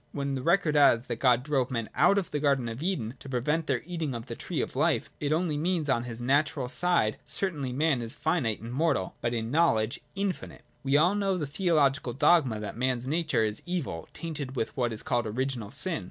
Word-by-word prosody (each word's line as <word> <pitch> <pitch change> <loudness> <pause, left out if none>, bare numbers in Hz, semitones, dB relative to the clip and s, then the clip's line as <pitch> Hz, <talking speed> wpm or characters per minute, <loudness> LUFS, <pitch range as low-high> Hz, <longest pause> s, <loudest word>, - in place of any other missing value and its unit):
When 140 -1 -2
the 130 - -2
record 165 0 +2
adds 125 -5 +5
that 115 - -4
God 125 -2 +4
drove 135 -4 0
men 115 -3 -2
out 200 - +4
of 195 -4 -1
the 150 - -1
Garden 140 -4 +1
of 115 +4 -6
Eden 155 - -2
to 135 - -10
prevent 150 +6 0
their - - 0
eating 165 -6 -3
of 115 - -6
the - - -6
tree - - -4
of - - -3
life, - - +1
it 145 0 -1
only 160 -1 +1
means 170 +1 0
that 140 - +2
on 120 - -3
his 120 0 -6
natural 140 0 +1
side 170 -8 +2
certainly 150 -10 -2
man 140 0 +1
is 115 0 -2
finite 135 -11 0
and 115 +2 -7
mortal, 140 - 0
but 120 0 -1
in 115 0 -3
knowledge 120 -8 +2 0.2
infinite. 195 -1 -4 0.2
We 140 0 +2
all 175 +6 +4
know 200 -2 0
the 155 - -2
theological 145 -5 +1
dogma 135 -5 +3
that 105 - -5
man's 125 0 -1
nature 155 -5 +1
is 105 -1 -2
evil, 150 - -3
tainted 150 -5 -5
with 115 - -2
what 120 -3 0
is 110 - -5
called 120 -3 0
Original 120 -1 -2
Sin. 160 +6 0
140 Hz, 220 wpm, -28 LUFS, 120-160 Hz, 0.2 s, adds